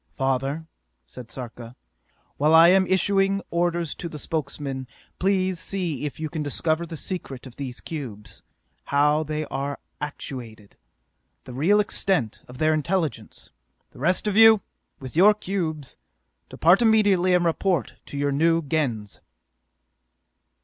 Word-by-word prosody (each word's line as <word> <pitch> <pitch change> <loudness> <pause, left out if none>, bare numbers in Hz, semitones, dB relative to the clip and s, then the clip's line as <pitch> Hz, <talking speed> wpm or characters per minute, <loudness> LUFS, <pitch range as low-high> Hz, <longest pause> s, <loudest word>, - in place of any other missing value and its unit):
"Father," 135 +4 -1 0.4
said 125 -3 -11
Sarka, 120 -1 -8 0.6
"while 155 +3 +4
I 165 +1 +8
am 190 0 +4
issuing 195 +1 +2
orders 170 -1 0
to 170 - -6
the 155 - -8
Spokesmen, 140 -3 -4 0.3
please 185 -2 +1
see 175 -7 -3
if 145 - -9
you 160 - -2
can 155 +1 -5
discover 155 +3 -1
the 165 - -7
secret 140 -8 -6
of 125 -2 -12
these 130 -3 -6
cubes: 120 -10 -8 0.4
how 150 +2 +3
they 155 0 -3
are 140 0 -4 0.2
actuated, 120 -7 -7 0.7
the 125 - -10
real 170 +11 +3
extent 190 - 0
of 125 - -11
their 155 +2 +2
intelligence! 155 - -2 0.4
The - - -16
rest 180 +9 +1
of 210 -2 0
you, 220 -1 +8 0.4
with 130 -1 -9
your 205 +5 +6
cubes, 165 -9 -4 0.5
depart 175 +7 +4
immediately 205 -5 +4
and 175 -1 +2
report 170 - 0
to 145 - -7
your 145 0 0
new 165 +3 +2
Gens!" 130 -9 -2
155 Hz, 135 wpm, -24 LUFS, 135-180 Hz, 0.7 s, I